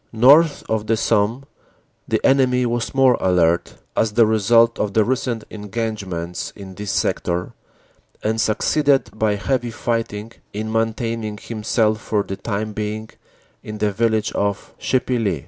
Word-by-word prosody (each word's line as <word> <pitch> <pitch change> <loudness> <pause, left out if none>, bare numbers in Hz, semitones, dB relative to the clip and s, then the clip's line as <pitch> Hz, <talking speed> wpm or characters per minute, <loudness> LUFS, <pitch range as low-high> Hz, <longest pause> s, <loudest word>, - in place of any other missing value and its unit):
North 145 +7 +5
of 110 -1 -1
the 115 - +2
Somme 115 +3 +1 0.6
the - - +1
enemy 125 -2 +3
was 120 +2 -2
more 130 -2 +4
alert, 85 -2 +2 0.2
as 110 -2 +1
the 115 +1 +5
result 115 +2 +3
of 105 -2 -2
the 110 -1 +4
recent 125 -3 -1
engagements 105 -5 -4
in 95 -2 -10
this 105 +2 -6
sector, 90 -2 -1 0.7
and 110 +1 0
succeeded 140 +6 +2
by 110 -1 +1
heavy 120 +5 -1
fighting 115 -2 -3 0.2
in 110 +2 -4
maintaining 115 -1 -2
himself 110 0 0
for 105 -2 0
the 95 - -5
time 105 +1 -3
being 110 +1 -4 0.5
in 105 0 -7
the 105 0 0
vil 115 +3 +1
lage 110 -1 -1
of 100 0 -2
Chipilly. 125 -5 0
110 Hz, 145 wpm, -21 LUFS, 105-115 Hz, 0.7 s, North